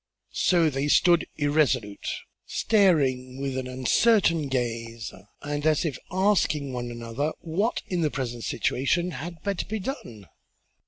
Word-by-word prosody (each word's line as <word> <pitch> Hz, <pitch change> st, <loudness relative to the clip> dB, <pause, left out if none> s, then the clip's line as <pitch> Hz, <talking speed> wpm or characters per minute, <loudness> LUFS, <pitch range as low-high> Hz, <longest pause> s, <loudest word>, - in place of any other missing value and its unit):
So 170 Hz, -4 st, +3 dB
they 135 Hz, +1 st, -1 dB
stood 170 Hz, +3 st, +4 dB
irresolute, 145 Hz, -8 st, +1 dB, 0.4 s
staring 135 Hz, -, +2 dB
with 135 Hz, -1 st, -2 dB
an 130 Hz, -1 st, -3 dB
uncertain 165 Hz, -, +3 dB
gaze 115 Hz, -4 st, -3 dB, 0.3 s
and 145 Hz, 0 st, -3 dB
as 155 Hz, +1 st, +2 dB
if 150 Hz, -5 st, -1 dB, 0.2 s
asking 180 Hz, -8 st, +1 dB
one 120 Hz, -1 st, -3 dB
another 120 Hz, +6 st, -3 dB
what 190 Hz, +8 st, -1 dB
in 180 Hz, -2 st, -2 dB
the 155 Hz, -, +2 dB
present 120 Hz, -4 st, -4 dB
situation 170 Hz, +7 st, 0 dB
had 165 Hz, 0 st, -7 dB
better 200 Hz, -3 st, -2 dB
be 220 Hz, -, -2 dB
done. 185 Hz, -, -6 dB
145 Hz, 130 wpm, -26 LUFS, 125-175 Hz, 0.4 s, stood